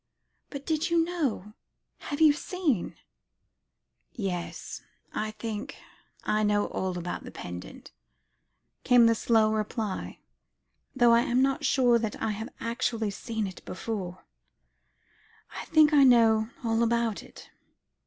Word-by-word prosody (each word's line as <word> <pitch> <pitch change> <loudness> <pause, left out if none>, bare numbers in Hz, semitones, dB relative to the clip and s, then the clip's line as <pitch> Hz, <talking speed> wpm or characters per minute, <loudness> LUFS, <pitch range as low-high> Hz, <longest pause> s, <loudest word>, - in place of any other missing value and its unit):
"But 280 -1 -8
did 315 +1 0
you 335 -1 +3
know; 275 - -3 0.5
had 285 - -5
you 310 -2 +7
seen 305 - -2 0.6
" - - -53 0.2
"Yes 175 -1 -6 0.3
I 215 - -2
think 215 -1 -6 0.5
I 215 - +1
know 205 -1 +2
all 185 -1 -3
about 175 0 -5
the - - -8
pendant," 90 0 -9 0.9
came 245 -2 +6
the 230 - +5
slow 220 -1 +2
reply; 215 -1 -3 0.8
"though 240 -2 +5
I 235 - +6
am 245 +2 +2
not 275 +3 0
sure 245 -3 +4
that 220 -2 -4
I 220 - -1
have 220 +4 -5
actually 230 -2 -1
seen 220 +1 -4
it 190 -2 -8
before 185 -3 -5 1.3
I - - -6
think 310 -1 +4
I 285 -2 +7
know 225 -3 +5 0.2
all 225 0 +1
about 235 -2 +1
it. - - -15
230 Hz, 135 wpm, -28 LUFS, 215-265 Hz, 1.3 s, you